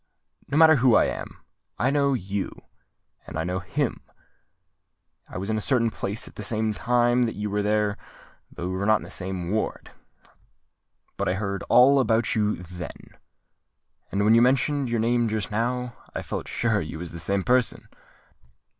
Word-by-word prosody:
"No 140 Hz, -, -1 dB
matter 160 Hz, -1 st, +7 dB
who 125 Hz, -2 st, +4 dB
I -, -, +5 dB
am: -, -, -6 dB, 0.3 s
I 130 Hz, -, +1 dB
know 140 Hz, -1 st, +2 dB
you—and 100 Hz, -5 st, -8 dB
I 80 Hz, -, -1 dB
know 90 Hz, +2 st, -2 dB
him. 90 Hz, -2 st, -2 dB, 1.3 s
I -, -, -7 dB
was 100 Hz, +4 st, -3 dB
in 110 Hz, -, 0 dB
a -, -, -5 dB
certain 115 Hz, -1 st, +2 dB
place 100 Hz, +2 st, -3 dB
at -, -, -13 dB
the -, -, -8 dB
same 110 Hz, +1 st, -1 dB
time 120 Hz, +1 st, +2 dB
that 115 Hz, -, -5 dB
you 105 Hz, 0 st, -3 dB
were 105 Hz, 0 st, 0 dB
there; 105 Hz, 0 st, 0 dB, 0.5 s
though 85 Hz, -, -5 dB
we 95 Hz, -, -3 dB
were 100 Hz, +2 st, -1 dB
not 110 Hz, -, +6 dB
in -, -, -3 dB
the -, -, -8 dB
same 90 Hz, -1 st, -4 dB
ward. 110 Hz, +1 st, -2 dB, 1.3 s
But -, -, 0 dB
I 90 Hz, -, 0 dB
heard 100 Hz, -1 st, -3 dB
all 135 Hz, +3 st, +6 dB
about 115 Hz, -3 st, +2 dB
you 105 Hz, -1 st, +1 dB
then; 90 Hz, -3 st, -9 dB, 1.0 s
and 100 Hz, +1 st, +1 dB
when 110 Hz, -, +6 dB
you 115 Hz, -, +6 dB
mentioned 135 Hz, +2 st, +2 dB
your 115 Hz, -1 st, 0 dB
name 120 Hz, +1 st, +2 dB
just 110 Hz, -3 st, -2 dB
now, 120 Hz, +2 st, -2 dB, 0.2 s
I -, -, -3 dB
felt -, -, -5 dB
sure 110 Hz, -3 st, 0 dB
you 80 Hz, +1 st, -6 dB
was 85 Hz, +1 st, -7 dB
the 85 Hz, -, -7 dB
same 100 Hz, +3 st, 0 dB
person. 125 Hz, +2 st, +1 dB
110 Hz, 180 wpm, -25 LUFS, 100-120 Hz, 1.3 s, matter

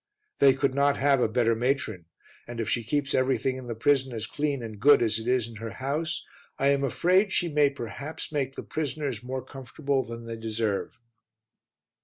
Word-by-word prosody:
They 135 Hz, -2 st, +6 dB
could 135 Hz, -1 st, +1 dB
not 140 Hz, +1 st, +3 dB
have 140 Hz, -1 st, +3 dB
a 115 Hz, -, +2 dB
better 115 Hz, 0 st, +2 dB
matron 120 Hz, -, -1 dB, 0.4 s
and 120 Hz, -1 st, -7 dB
if 115 Hz, -, -1 dB
she 120 Hz, -, 0 dB
keeps 140 Hz, +4 st, -1 dB
everything 130 Hz, 0 st, +1 dB
in 130 Hz, -1 st, -8 dB
the 115 Hz, -, -4 dB
prison 130 Hz, +2 st, +2 dB
as 110 Hz, -1 st, -3 dB
clean 145 Hz, 0 st, -2 dB
and 110 Hz, -2 st, -7 dB
good 145 Hz, +6 st, +7 dB
as 110 Hz, -1 st, +1 dB
it 110 Hz, -, -7 dB
is 125 Hz, -2 st, +2 dB
in 115 Hz, -1 st, -10 dB
her 115 Hz, +1 st, -6 dB
house, 150 Hz, +5 st, -3 dB, 0.3 s
I 140 Hz, -, +3 dB
am 140 Hz, 0 st, +2 dB
afraid 185 Hz, -, +3 dB
she 175 Hz, -2 st, +1 dB
may 145 Hz, -1 st, +5 dB
perhaps 140 Hz, +5 st, -6 dB
make 135 Hz, -3 st, -2 dB
the -, -, -6 dB
prisoners 145 Hz, -6 st, -3 dB
more 130 Hz, +1 st, -5 dB
comfortable 135 Hz, +1 st, -2 dB
than 115 Hz, 0 st, -8 dB
they 115 Hz, 0 st, -5 dB
deserve. 110 Hz, 0 st, -2 dB
130 Hz, 195 wpm, -27 LUFS, 115-140 Hz, 0.4 s, good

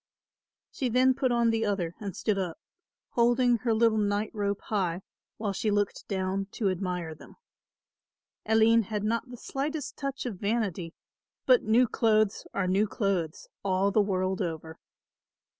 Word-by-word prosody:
She 260 Hz, -4 st, -2 dB
then 255 Hz, +2 st, +4 dB
put 255 Hz, -1 st, 0 dB
on 235 Hz, -1 st, +3 dB
the 225 Hz, 0 st, 0 dB
other 195 Hz, -6 st, -1 dB
and 200 Hz, -4 st, -5 dB
stood 210 Hz, -3 st, 0 dB
up, 180 Hz, -3 st, -3 dB, 0.5 s
holding 240 Hz, 0 st, +3 dB
her 235 Hz, 0 st, -1 dB
little 220 Hz, 0 st, +3 dB
nightrobe 205 Hz, 0 st, -1 dB
high 190 Hz, -4 st, -1 dB, 0.3 s
while 210 Hz, -2 st, -2 dB
she 215 Hz, +3 st, -1 dB
looked 205 Hz, -1 st, -1 dB
down 190 Hz, 0 st, -1 dB
to 200 Hz, -4 st, 0 dB
admire 180 Hz, -3 st, -3 dB
them. 155 Hz, -, -15 dB, 1.1 s
Aline 225 Hz, +1 st, +5 dB
had 210 Hz, 0 st, -3 dB
not 230 Hz, +4 st, -1 dB
the 245 Hz, -, -9 dB
slightest 285 Hz, +4 st, -4 dB
touch 275 Hz, -1 st, -4 dB
of 215 Hz, -7 st, -4 dB
vanity, 200 Hz, -6 st, -2 dB, 0.5 s
but -, -, +6 dB
new 240 Hz, +3 st, +4 dB
clothes 215 Hz, -3 st, +1 dB
are 195 Hz, -, -1 dB
new 195 Hz, +4 st, +2 dB
clothes 195 Hz, -7 st, -2 dB, 0.2 s
all 195 Hz, +1 st, +2 dB
the 210 Hz, -, +4 dB
world 190 Hz, -1 st, 0 dB
over. 160 Hz, -2 st, -5 dB
210 Hz, 150 wpm, -28 LUFS, 190-230 Hz, 1.1 s, but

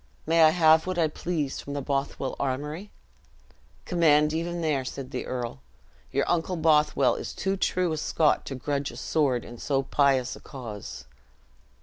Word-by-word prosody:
"May 165 Hz, +1 st, +3 dB
I 160 Hz, -, +8 dB
have 160 Hz, 0 st, +4 dB
what 185 Hz, -1 st, -2 dB
I 165 Hz, -2 st, +3 dB
please 155 Hz, -2 st, -3 dB
from 140 Hz, -, -7 dB
the 145 Hz, -, -2 dB
Bothwell 135 Hz, -1 st, -2 dB
armory?" 150 Hz, +8 st, -3 dB, 1.0 s
"Command 150 Hz, -4 st, +3 dB
even 170 Hz, +1 st, -2 dB
there," 150 Hz, -5 st, 0 dB
said 130 Hz, 0 st, -7 dB
the 125 Hz, -, -4 dB
earl; 120 Hz, -, -4 dB, 0.5 s
"your 140 Hz, +1 st, 0 dB
uncle 175 Hz, +1 st, 0 dB
Bothwell 150 Hz, -4 st, +3 dB
is -, -, -6 dB
too 195 Hz, 0 st, -1 dB
true 185 Hz, -2 st, 0 dB
a 155 Hz, -, -2 dB
Scot 155 Hz, 0 st, +2 dB
to 135 Hz, -, -4 dB
grudge 140 Hz, +2 st, -2 dB
a -, -, -10 dB
sword 135 Hz, -6 st, 0 dB
in 120 Hz, -1 st, -10 dB
so 135 Hz, -2 st, 0 dB
pious 135 Hz, -3 st, +2 dB
a -, -, -12 dB
cause." 115 Hz, -8 st, -8 dB
150 Hz, 165 wpm, -27 LUFS, 135-165 Hz, 1.0 s, I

